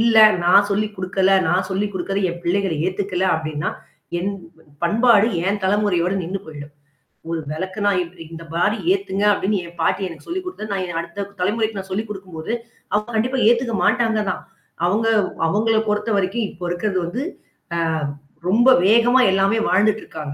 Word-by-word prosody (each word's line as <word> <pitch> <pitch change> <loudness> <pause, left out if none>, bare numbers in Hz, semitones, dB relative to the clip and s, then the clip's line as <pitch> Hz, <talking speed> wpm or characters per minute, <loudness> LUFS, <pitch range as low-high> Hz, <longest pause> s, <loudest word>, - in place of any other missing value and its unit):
இல்ல. 230 -1 +4 0.3
நான் 200 +3 +6
சொல்லிக் 210 +1 -1
குடுக்கல. 190 +1 +1 0.2
நான் 180 +1 +1
சொல்லிக் 205 +2 -1
குடுக்குறதை 195 +2 -2
என் 175 - -8
பிள்ளைகள் 185 -2 0
ஏத்துக்கல 185 0 -1
அப்படின்னா, 155 -1 -3 0.5
என் 195 +4 -2 0.2
ப 160 - -22 0.2
பண்பாடு 220 +4 +4 0.2
என் 200 +1 0
தலைமுறையோட 190 -3 +1
நின்னு 185 +4 -3
போய்டும். 150 -1 -9 0.6
"ஒரு 165 -1 -1
விளக்குன்னா 190 +5 -2
இப்பிடி 170 -1 -8
இந்த 165 - -8
மாதிரி 210 +6 +1 0.2
ஏத்துங்க 295 - -2
"அப்படின்னு 205 +1 0
என் 170 0 -13
பாட்டி 200 - +1
எனக்கு 165 -3 -11
சொல்லிக் 370 +2 -4
குடுத்தது, 215 - -6
நான் 180 -4 -2
அடுத்த 170 +4 -6 0.2
தலைமுறைக்கு 215 +3 0
நான் 190 0 -8
சொல்லிக் 215 +3 -2
குடுக்கும்போது, 190 -1 -6 0.4
அவங்க 210 +2 0
கண்டிப்பா 250 +4 0
ஏத்துக்க 235 -1 +1
மாட்டாங்க 225 0 +2
தான். - - -6 0.4
அவங்க 210 +6 +1 0.4
அவங்களை 220 +5 +2
பொறுத்தவரைக்கும் 210 0 0
இப்போ 175 0 -8
இருக்கிறது 185 +2 -1
வந்து, 230 +11 -3 0.5
அ - - 0 0.7
ரொம்ப 235 +6 +5 0.2
வேகமா 235 +5 +5
எல்லாமே 195 +3 +2
வாழ்ந்துட்டு 210 +4 +2
இருக்காங்க. 150 -3 -7
200 Hz, 155 wpm, -21 LUFS, 180-215 Hz, 0.7 s, நான்